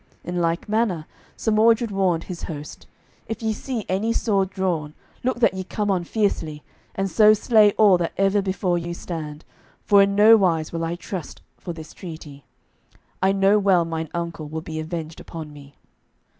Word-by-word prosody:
In 175 0 -2
like 165 +1 -1
manner 210 -7 0 0.3
Sir 220 - -1
Mordred 225 +1 +3
warned 185 -4 +1
his 180 -3 -7
host: 150 -2 -8 0.4
"If 225 0 -5
ye 220 0 +1
see 230 0 -5
any 200 +5 0
sword 195 -5 +1
drawn, 175 -6 -2 0.3
look 255 0 -1
that - - +4
ye 190 0 -4
come 205 +2 -2
on 180 -3 0
fiercely, 165 -8 -1 0.3
and 195 0 -1
so 215 +2 +6
slay 210 -1 +4
all 200 -5 +5
that 170 - -2
ever 195 +1 +3
before 185 -2 -1
you 170 0 -5
stand, 155 -4 -7 0.4
for 200 -1 +6
in 200 0 +2
no 220 +2 +8
wise 165 -6 +1
will 165 0 -2
I 165 +1 -2
trust 180 -1 -7 0.2
for 175 - -6
this 160 -2 -9
treaty. 155 -6 -10 0.8
I 190 +1 +4
know 195 +2 +3
well 190 -4 +3
mine 160 -1 -4
uncle 170 -2 -4
will 160 +1 -4
be 160 0 -6
avenged 160 0 -5
upon 160 -3 -8
me." 140 -1 -14
185 Hz, 180 wpm, -23 LUFS, 165-205 Hz, 0.8 s, no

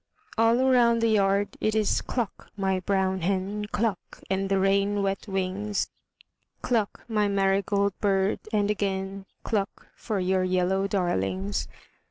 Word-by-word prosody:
All 225 +1 +4
round 235 -2 +4
the 230 - +3
yard 200 -1 +2
it 215 0 +1
is 215 -2 +2
cluck, 240 -5 -4
my 190 -1 +1
brown 190 0 0
hen, 195 +3 -1
Cluck, 210 -2 -2
and 195 0 0
the 195 - +2
rain 200 +1 +2
wet 195 +2 -2
wings, 195 +2 -1 0.7
Cluck, 225 -5 -1
my 210 -3 +1
marigold 200 0 +1
bird, 195 -1 +1
and 210 -1 +2
again 195 -1 -3 0.2
Cluck 205 -3 -2
for 215 -3 -3
your 185 0 +1
yellow 185 +1 +1
darlings. 95 - -1
195 Hz, 135 wpm, -26 LUFS, 190-210 Hz, 0.7 s, All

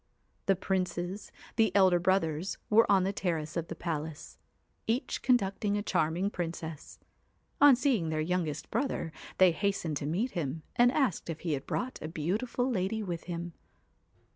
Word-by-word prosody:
The 195 - +5
princes, 185 +1 -2 0.3
the 220 -4 +4
elder 185 -3 +5
brothers, 175 -1 0
were 220 0 +6
on 195 -2 +5
the 195 +2 0
terrace 165 -5 -2
of 170 -1 -2
the - - -6
palace, 160 -2 -5 0.5
each 235 +4 -1
conducting 205 -4 +2
a 205 - -2
charming 175 +2 0
princess. 165 -4 -5 0.6
On 285 -2 +9
seeing 240 - +1
their 155 -1 -1
youngest 160 -2 -2
brother 270 - -1 0.3
they 185 -1 +7
hastened 175 -4 -1
to 145 - -4
meet 205 - 0
him, 160 -3 -3
and 245 +1 +5
asked 255 - 0
if 165 -1 -4
he 165 -3 -1
had 135 - -4
brought 255 +1 -3
a 155 - -4
beautiful 200 +11 -1
lady 220 -2 -1
with 175 -4 -4
him. 175 -1 -5
180 Hz, 160 wpm, -30 LUFS, 165-205 Hz, 0.6 s, On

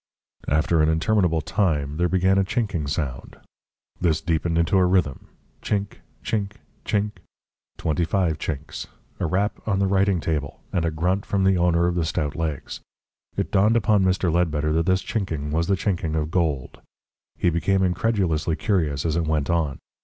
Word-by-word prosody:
After 75 +2 +2
an 75 - +3
interminable 85 0 +2
time, 75 -5 0
there 90 +1 +1
began 95 +1 +3
a - - +4
chinking 95 -7 -1
sound. 70 -4 -4 0.6
This 80 -3 +2
deepened 80 0 0
into 85 +3 +3
a 90 - +4
rhythm: 90 -7 0 0.3
chink, 100 -1 -2 0.3
chink, 105 -2 -1 0.3
chink 105 -1 -1 0.6
twenty 80 +1 0
five 85 -2 0
chinks 75 0 -5 0.3
a - - 0
rap 100 +6 0
on 100 -3 +1
the 100 - +2
writing 95 -1 +2
table, 75 -4 -3
and 85 -2 +1
a - - +2
grunt 90 +5 0
from 100 -1 0
the 95 0 +4
owner 85 -1 +3
of 90 - +1
the 85 -1 0
stout 75 -2 -2
legs. 80 -4 -4 0.6
It - - -1
dawned 105 +4 +4
upon 105 -3 +3
Mr. 90 -2 +1
Ledbetter 75 -3 +1
that 80 +2 +1
this 95 +1 +2
chinking 95 -11 -3
was 80 +2 0
the 100 - +3
chinking 90 -5 -1
of 80 0 -1
gold. 80 -8 -1 0.6
He 90 - +2
became 95 +4 +1
incredulously 90 -4 +1
curious 80 - 0
as 80 -1 0
it 85 -2 0
went 80 -1 0
on. 80 -6 0
85 Hz, 170 wpm, -24 LUFS, 80-95 Hz, 0.6 s, a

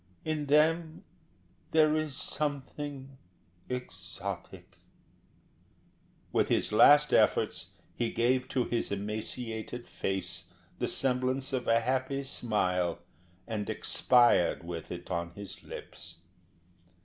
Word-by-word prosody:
In 155 -2 -1
them 160 +2 +2 0.7
there 155 -1 +5
is 155 -3 -1
something 140 -2 -4 0.5
exotic." 100 -5 -7 1.5
With - - +2
his - - +1
last 145 +7 +7
efforts - - +3 0.3
he 120 -1 -1
gave 125 +3 +1
to 130 - +1
his 120 -3 -2
emaciated 110 +3 -4
face 90 -3 -3 0.3
the - - 0
semblance 130 +1 0
of 125 -2 -1
a 115 0 +4
happy 130 +3 -1
smile, 90 -9 0 0.5
and 105 -3 -3
expired 120 -9 +3
with 85 -1 -6
it 90 0 -7
on 85 +1 -2
his 100 -1 -8
lips. 85 0 -9
125 Hz, 100 wpm, -30 LUFS, 100-135 Hz, 1.5 s, last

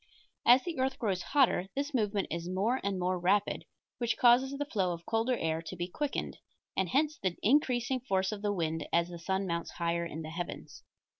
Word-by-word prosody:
As 250 +2 +8
the 335 -6 -4
earth 260 +1 0
grows 195 -6 -1
hotter 250 -7 +2
this 285 +2 -2
movement 210 -5 0
is 170 +2 -3
more 210 +8 +1
and 200 -1 -1
more 180 0 0
rapid, 195 +4 +1 0.3
which 240 -1 0
causes 250 +2 +5
the 290 - -2
flow 190 -9 0
of 170 0 -9
colder 230 +2 +1
air 160 0 -1
to 165 - -7
be 175 0 -3
quickened, 285 +10 -3 0.4
and 190 -2 0
hence 305 - +1
the 185 -2 -1
increasing 255 0 +2
force 190 -6 0
of 210 -1 -5
the 205 -1 0
wind 160 -5 -2
as 170 0 +2
the 170 -1 -8
sun 190 +3 -1
mounts 170 -2 -2
higher 170 0 -1
in 165 -1 -5
the 155 - -7
heavens. 175 +1 -6
195 Hz, 205 wpm, -31 LUFS, 175-250 Hz, 0.4 s, As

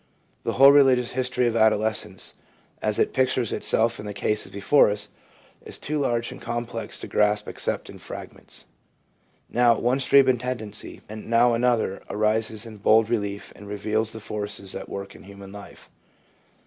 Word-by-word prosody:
The - - -2
whole 135 +1 +8
religious 130 -4 +4
history 125 -1 0
of 115 -1 0
adolescence, 110 -1 +1 0.5
as 105 -1 0
it - - +1
pictures 130 -3 +1
itself 115 +1 +2
in 105 - -7
the 105 - -6
cases 105 +1 -1
before 100 +8 +4
us, 105 0 -3 0.5
is - - -5
too 150 +1 -3
large 120 -4 0
and - - -10
complex 120 0 -4
to - - -6
grasp 105 0 +1
except - - -3
in - - -11
fragments. - - -6 0.8
Now 120 -1 +3
one 125 +4 +1
stream 135 0 +5
of 125 -2 +3
tendency, 115 -4 -5
and 110 +1 -9
now 120 +1 +4
another, 115 -5 +1
arises 110 +1 0
in 110 -2 -10
bold 110 +2 +3
relief 100 -3 -3
and 100 - -12
reveals 110 +2 -1
the 110 - -7
forces 105 -2 -4
at - - -7
work 100 0 -6
in - - -14
human 100 0 -11
life. 100 0 -12
110 Hz, 165 wpm, -24 LUFS, 105-125 Hz, 0.8 s, whole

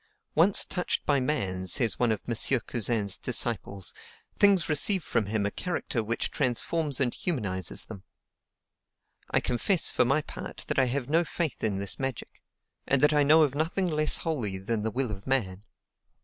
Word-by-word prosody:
"Once 180 +6 +4
touched 180 -2 -2
by 145 -2 +2
man," 95 -10 -2
says 115 -1 +1
one 120 -2 +2
of 110 - -2
M. 120 - -1 0.3
Cousin's 110 -4 -2
disciples, 105 -6 -1 0.4
"things 200 -4 +4
receive 165 +4 +2
from 110 -7 -1
him 105 -1 -1
a 100 - -1
character 150 - -3
which 115 +2 -2
transforms 145 +3 +1
and 125 -3 +1
humanizes 100 - 0
them." 105 -4 -10 1.3
I - - +2
confess, 160 +9 +2
for - - +3
my 140 +5 +1
part, - - -8
that - - +1
I 130 - +4
have 125 0 -2
no 165 +4 +2
faith 165 -2 -4
in 105 -3 0
this 100 -1 0
magic, 135 -4 -5 0.5
and 135 - +2
that 150 - +5
I 150 - +3
know 155 +3 +5
of 140 -4 0
nothing 165 +5 -1
less 155 -1 +2
holy 120 -12 -2
than 105 +3 -3
the 110 - -1
will 125 +1 -2
of 100 +2 -8
man. 100 -8 0
125 Hz, 175 wpm, -27 LUFS, 105-155 Hz, 1.3 s, that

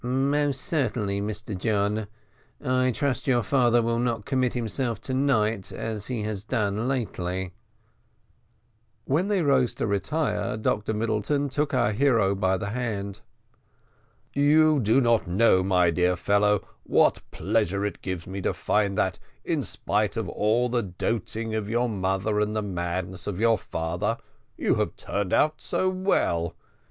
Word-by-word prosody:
"Most 135 +2 +1
certainly, 115 -10 -1
Mr 105 0 -4
John. 105 +2 0 0.5
I 130 0 +1
trust 135 0 -1
your 120 -3 +3
father 120 -1 +3
will 115 0 0
not 115 -3 -1
commit 130 -2 +1
himself 120 -1 -2
to 130 - -5
night 115 -7 +1
as 110 -2 -4
he 120 -4 -3
has 105 -2 -4
done 105 +1 -1
lately." 95 -8 -2 1.5
When 160 +8 +1
they 200 -4 +1
rose 130 -5 +2
to - - -2
retire 105 +5 -1
Dr 110 0 -1
Middleton 115 +6 0
took 145 +1 -1
our 120 -4 +2
hero 115 -4 +3
by 95 -1 +1
the 100 +2 -4
hand. 105 -5 -3 1.1
"You 150 +1 +4
do 115 +3 +3
not 115 -5 +2
know, 95 +1 +4
my 90 -2 +3
dear 90 +2 +2
fellow, 100 +2 +2
what - - +3
pleasure 100 +3 0
it 105 - -4
gives 95 -3 -4
me 95 +1 -5
to - - -1
find 100 -2 0
that, 95 -1 0 0.3
in - - 0
spite 105 0 -1
of 115 - -1
the 120 +6 +1
doting 110 +3 -3
of 110 -1 -2
your 120 +2 +1
mother 100 0 0
and 105 +1 0
the 105 - 0
madness 90 -1 -3
of 100 -2 -3
your 115 -1 +3
father, 80 +1 -2 0.4
you - - +2
have - - -1
turned 100 -2 -3
out 155 0 +2
so 185 - 0
well. 185 - 0
110 Hz, 150 wpm, -26 LUFS, 100-125 Hz, 1.5 s, You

